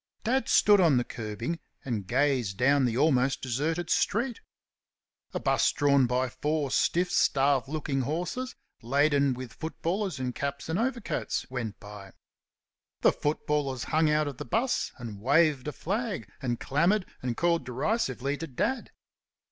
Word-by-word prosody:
Dad 255 +2 +1
stood 205 -2 +6
on 160 -7 +5
the 125 - +2
kerbing 115 +8 -5 0.3
and 110 -7 -3
gazed 130 -9 +1
down 135 +1 +4
the 120 -1 0
almost 135 -2 +3
deserted 160 +7 -2
street. 235 +3 +1 0.9
A - - -3
'bus - - +2
drawn 140 -3 +3
by 125 +2 +1
four 150 +2 -2
stiff, 180 +1 +2
starved 135 -3 +3
looking 145 -2 -2
horses, 175 - -3 0.3
laden 140 +2 +2
with 125 -2 -8
footballers 170 +1 -3
in 125 -1 -2
caps 140 +3 -4
and 165 +4 0
overcoats, 240 -2 -2
went 115 -5 -4
by. 100 -2 -11 0.9
The - - +6
footballers 145 -3 -1
hung 155 0 +4
out 150 0 +2
of 140 -3 -5
the - - -5
'bus 240 +3 0
and 110 -5 -8
waved 145 +2 +3
a - - -1
flag, 200 - -3
and 120 -3 -2
clamoured 175 +8 +2 0.2
and 125 -2 -3
called 170 -3 +2
derisively 135 - -1
to 165 - -5
Dad. 240 - -2
140 Hz, 150 wpm, -28 LUFS, 125-170 Hz, 0.9 s, stood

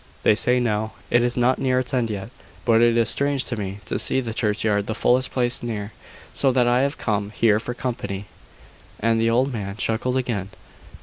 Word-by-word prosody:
They - - +5
say 125 +3 +2
now, 110 -2 -1 0.2
it 120 - +4
is 120 +1 0
not 125 +1 +2
near 130 -1 +1
its 130 0 -2
end 120 -3 +1
yet: 100 +1 -5 0.3
but 115 -2 +4
it 120 0 +4
is 115 -2 +3
strange 140 +1 +2
to 120 - -3
me 100 -1 -5
to - - -2
see - - +2
the 115 -4 -4
churchyard 105 -2 0
the 110 - -2
fullest 130 +1 +3
place 125 0 +2
near, 110 -3 -4 0.4
so 135 - +2
that 125 -1 +3
I 120 +1 +3
have 140 +1 -1
to - - -11
come 105 -2 -1
here 105 0 +2
for 120 +2 -5
company." 115 -6 -4 0.7
And 115 +1 +1
the 115 - +2
old 130 +3 +1
man 100 -3 -5
chuckled 120 +4 -1
again. 115 -7 -2
115 Hz, 210 wpm, -23 LUFS, 105-125 Hz, 0.7 s, They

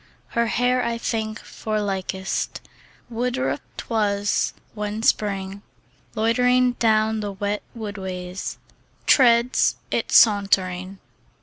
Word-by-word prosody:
Her 235 0 +1
hair 250 +2 +1
I 235 0 -1
think; 220 -1 -2
for 215 -1 -4
likest 190 -1 -2 0.5
Woodruffe 250 +4 -1 0.2
'twas, 205 -3 0 0.2
when 210 +1 -4
Spring 195 -3 0 0.5
Loitering 250 +3 +3
down 220 -1 +2
the 205 -1 -4
wet 205 +1 -2 0.2
woodways 190 -4 -5 0.5
Treads 240 -1 +4 0.2
it - - -1
sauntering. 195 -3 +3
215 Hz, 95 wpm, -23 LUFS, 200-235 Hz, 0.5 s, Treads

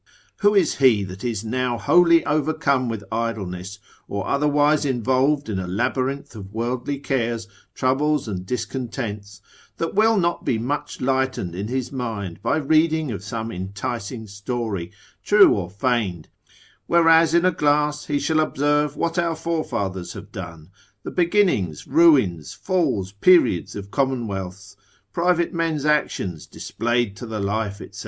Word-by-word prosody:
Who 205 0 +3
is 185 -6 +3
he 125 -7 +4
that 95 +1 -8
is 115 -3 -3
now 125 +1 -1
wholly 170 +9 +4
overcome 145 -4 +1
with 110 -3 -4
idleness, 100 -4 -3 0.3
or 100 -1 -3
otherwise 145 +1 +2
involved 130 +2 +1
in 100 -4 -2
a 90 - -4
labyrinth 130 +7 -2
of 100 -2 -9
worldly 120 +5 -2
cares, 120 -5 -2 0.3
troubles 140 +2 +1
and 95 -4 -4
discontents, 105 -3 -5 0.4
that 165 - -2
will 220 +2 +4
not 170 -2 0
be 115 - 0
much 145 +6 -4
lightened 130 -8 0
in 100 +4 -4
his 130 +1 -3
mind 110 -9 -5
by - - +1
reading 155 0 +2
of 100 -2 -6
some 110 +2 -4
enticing 100 +4 -5
story, 100 -3 -4 0.3
true - - +6
or 85 - -3
feigned, 100 -5 -1 0.6
whereas 165 -1 +5
in 170 +1 +4
a 185 - +4
glass 150 -1 +1
he 145 - -1
shall 155 +2 +1
observe 145 -1 +1
what 170 +2 -1
our 170 -1 0
forefathers 100 - -3
have - - -10
done, 85 -2 -9 0.3
the - - -6
beginnings, 175 - +1
ruins, 130 - +3
falls, 160 - -1
periods 105 - +3
of 100 0 -7
commonwealths, 105 -7 -3 0.4
private 175 0 +1
men's 165 -4 -1
actions 120 - 0
displayed 120 -3 -2
to 120 - -8
the 110 -1 -4
life, 100 0 -2
&c. - - -11
125 Hz, 145 wpm, -22 LUFS, 100-150 Hz, 0.6 s, true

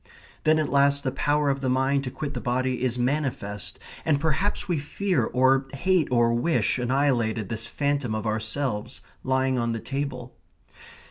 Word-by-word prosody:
Then 155 0 +5
at 155 -2 0
last 140 0 +3
the 130 - 0
power 145 +1 +1
of 135 0 -3
the 130 - 0
mind 135 +2 +2
to - - -2
quit 140 +2 -5
the - - -4
body 125 0 -1
is 125 -1 0
manifest, 125 -7 -2 0.3
and 150 -3 +2
perhaps 160 +7 0
we 175 -4 0
fear 185 +6 0
or 130 +1 +3
hate 180 +3 +2
or 120 -2 +3
wish 130 +2 +1
annihilated 120 -5 +1
this 115 0 -3
phantom 140 -5 -1
of 110 - -3
ourselves, 110 +1 -2 0.2
lying 130 0 +1
on 115 -1 0
the 115 - -3
table. 135 -1 -4
135 Hz, 170 wpm, -26 LUFS, 120-145 Hz, 0.3 s, Then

